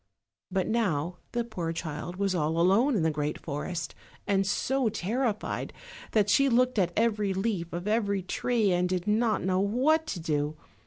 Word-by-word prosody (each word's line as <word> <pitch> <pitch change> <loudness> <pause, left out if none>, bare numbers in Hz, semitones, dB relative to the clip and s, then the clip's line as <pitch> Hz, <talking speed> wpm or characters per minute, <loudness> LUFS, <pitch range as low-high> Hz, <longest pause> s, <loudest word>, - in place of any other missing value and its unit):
But 190 -1 0
now 180 -7 0
the 240 -1 0
poor 180 -8 -4
child 165 +1 -5
was 195 0 0
all 160 -1 0
alone 215 +10 +4
in 185 - +1
the 160 - +2
great 150 0 -2
forest, 165 +3 -4 0.3
and 195 -1 +1
so 260 +3 +1
terrified 220 +2 -2 0.4
that 210 -2 +3
she 275 +6 +4
looked 250 -1 +3
at 175 -2 +2
every 210 -3 +1
leaf 190 -4 -1
of 175 +3 -4
every 200 -3 +1
tree, 220 +2 +1
and 180 0 +1
did 180 -1 -1
not 215 +1 +1
know 185 0 +1
what 265 +11 +2
to 190 - -3
do. 150 -2 -1
195 Hz, 170 wpm, -28 LUFS, 175-230 Hz, 0.4 s, alone